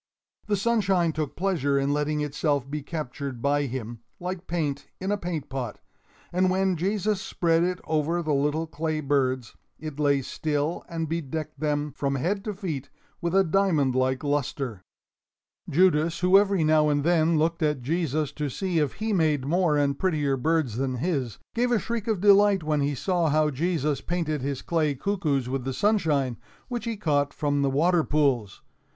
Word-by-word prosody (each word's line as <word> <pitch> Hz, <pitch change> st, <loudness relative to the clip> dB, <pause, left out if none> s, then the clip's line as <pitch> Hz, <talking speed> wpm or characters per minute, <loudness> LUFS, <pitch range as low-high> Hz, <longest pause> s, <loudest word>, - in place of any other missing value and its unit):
The 210 Hz, -, +2 dB
sunshine 195 Hz, -6 st, +2 dB
took 150 Hz, -3 st, -3 dB
pleasure 165 Hz, -7 st, +1 dB
in 140 Hz, +1 st, +1 dB
letting 150 Hz, +1 st, 0 dB
itself 145 Hz, -2 st, -1 dB
be 150 Hz, +2 st, -4 dB
captured 140 Hz, -4 st, -5 dB
by 145 Hz, +2 st, +1 dB
him, 120 Hz, -2 st, -5 dB, 0.2 s
like 180 Hz, 0 st, -5 dB
paint 145 Hz, -5 st, -2 dB
in 190 Hz, +2 st, -2 dB
a -, -, +3 dB
paint 170 Hz, -6 st, -4 dB
pot; 125 Hz, -5 st, -5 dB, 0.5 s
and 185 Hz, +1 st, +3 dB
when 190 Hz, 0 st, +1 dB
Jesus 200 Hz, +3 st, 0 dB
spread 165 Hz, -3 st, +1 dB
it 180 Hz, +1 st, -1 dB
over 160 Hz, +2 st, 0 dB
the 155 Hz, -2 st, 0 dB
little 150 Hz, +3 st, +1 dB
clay 155 Hz, 0 st, -2 dB
birds, 130 Hz, -5 st, 0 dB, 0.2 s
it 155 Hz, -2 st, -7 dB
lay 140 Hz, -2 st, +2 dB
still 150 Hz, +4 st, -2 dB
and 165 Hz, -1 st, -3 dB
bedecked 155 Hz, -2 st, -4 dB
them 150 Hz, -1 st, -1 dB
from 140 Hz, 0 st, -2 dB
head 190 Hz, +9 st, -1 dB
to 210 Hz, -2 st, -3 dB
feet 160 Hz, -, -4 dB, 0.3 s
with 170 Hz, +1 st, -1 dB
a 195 Hz, -, +6 dB
diamond 160 Hz, -7 st, +2 dB
like 130 Hz, +1 st, 0 dB
luster. 140 Hz, -6 st, -2 dB, 0.9 s
Judas, 165 Hz, 0 st, +3 dB
who 180 Hz, +1 st, +4 dB
every 200 Hz, -3 st, +4 dB
now 155 Hz, -1 st, +4 dB
and 145 Hz, -1 st, +1 dB
then 165 Hz, 0 st, +3 dB
looked 165 Hz, +2 st, +1 dB
at 150 Hz, -5 st, 0 dB
Jesus 155 Hz, -1 st, -1 dB
to 150 Hz, -1 st, -3 dB
see 180 Hz, +4 st, -1 dB
if 150 Hz, -3 st, 0 dB
he 220 Hz, +1 st, -2 dB
made 155 Hz, -7 st, +2 dB
more 165 Hz, 0 st, +2 dB
and 140 Hz, -1 st, +1 dB
prettier 150 Hz, -7 st, +1 dB
birds 140 Hz, -4 st, 0 dB
than 130 Hz, -1 st, -1 dB
his, 130 Hz, -, -2 dB, 0.2 s
gave 245 Hz, +1 st, +1 dB
a 240 Hz, -, +4 dB
shriek 230 Hz, 0 st, -3 dB
of 220 Hz, -4 st, +1 dB
delight 200 Hz, -2 st, +5 dB
when 150 Hz, -1 st, 0 dB
he 140 Hz, 0 st, 0 dB
saw 175 Hz, +2 st, +1 dB
how 150 Hz, 0 st, +2 dB
Jesus 150 Hz, -1 st, -1 dB
painted 165 Hz, -4 st, -2 dB
his 140 Hz, 0 st, -3 dB
clay 155 Hz, -4 st, +1 dB
cuckoos 150 Hz, -7 st, -1 dB
with 130 Hz, 0 st, -2 dB
the 135 Hz, +1 st, -3 dB
sunshine, 150 Hz, -, +1 dB, 0.3 s
which 240 Hz, -3 st, -3 dB
he 230 Hz, -2 st, -3 dB
caught 145 Hz, -6 st, 0 dB
from 145 Hz, -1 st, 0 dB
the 140 Hz, -, +2 dB
water 165 Hz, +5 st, +3 dB
pools. 135 Hz, -10 st, 0 dB
155 Hz, 180 wpm, -26 LUFS, 140-180 Hz, 0.9 s, a